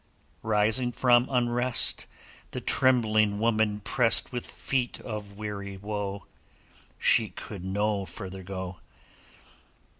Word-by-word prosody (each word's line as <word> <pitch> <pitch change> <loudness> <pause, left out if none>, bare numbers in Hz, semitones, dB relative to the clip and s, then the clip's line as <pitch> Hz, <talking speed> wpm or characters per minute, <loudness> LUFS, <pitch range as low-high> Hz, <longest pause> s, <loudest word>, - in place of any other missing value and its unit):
Rising 110 +3 +1
from 120 0 +3
unrest, 125 -1 +2 0.4
The - - -5
trembling 110 -5 +3
woman 110 -2 +1
pressed 115 +2 +3
With 125 -2 -5
feet 125 -2 -2
of 105 -3 -7
weary 100 -2 -6
woe; 100 -1 -5 0.7
She - - +3
could - - -8
no 100 +1 -1
further 95 -2 -8
go. 95 -1 -6
105 Hz, 100 wpm, -27 LUFS, 100-120 Hz, 0.7 s, from